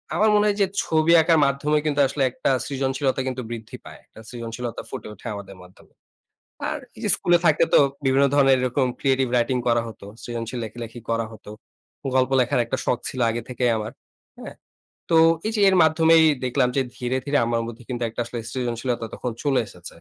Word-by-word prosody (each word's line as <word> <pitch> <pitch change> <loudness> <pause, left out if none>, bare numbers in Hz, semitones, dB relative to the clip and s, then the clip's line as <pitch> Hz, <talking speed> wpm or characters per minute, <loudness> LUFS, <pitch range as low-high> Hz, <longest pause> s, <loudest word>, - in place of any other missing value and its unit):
আমার 215 +1 +3
মনে 210 0 +4
হয় 205 0 0
যে, 200 - +5 0.2
ছবি 160 +1 +2
আঁকার 160 0 +3
মাধ্যমে 140 +2 +1
কিন্তু 145 -1 0
আসলে 135 0 -2
একটা - - -2 0.2
সৃজনশীলতা 135 -1 -1
কিন্তু 130 0 -3
বৃদ্ধি 115 -2 -7
পায়। - - -11
একটা - - -17
সৃজনশীলতা 115 0 -6
ফুটে - - -7
ওঠে 100 - -11
আমাদের 100 -1 -9
মাধ্যমে। 90 +1 -20 0.8
আর - - -3 0.2
এই - - -12
যে - - 0
স্কুলে 175 0 +3
থাকলে 160 +1 +4
তো - - +8 0.3
বিভিন্ন 135 +1 +4
ধরনের 135 -2 +5
এরকম 130 +1 +1
ক্রিয়েটিভ 135 -2 +1
রাইটিং 125 +2 +1
করা 120 0 +3
হতো, 110 -3 -11 0.2
সৃজনশীল 120 +1 -5
লেখালেখি 115 +2 -8
করা 115 0 0
হত। 110 - -15 0.7
গল্প 130 +1 +2
লেখার 125 0 +1
একটা 130 +3 -2
শখ 125 - +1
ছিল 130 - -7
আগে 120 +1 -3
থেকেই 125 -1 0
আমার, 110 +1 -5 0.5
হ্যাঁ? - - -9 0.5
তো, 165 - +4 0.3
এই 220 - -1
যে 210 - 0
এর 190 - +2
মাধ্যমেই 160 +1 +5 0.2
দেখলাম 125 0 +1
যে - - +4 0.2
ধীরে, 125 +1 -1
ধীরে 145 0 +1
আমার 115 0 0
মধ্যে 120 +1 -9
কিন্তু 120 -1 -3
একটা 120 - -4
আসলে 120 0 -6
সৃজনশীলতা 120 -1 -2
তখন 125 - -4
চলে 140 -3 +2
এসেছে। 90 -3 -11
130 Hz, 190 wpm, -23 LUFS, 120-145 Hz, 0.8 s, তো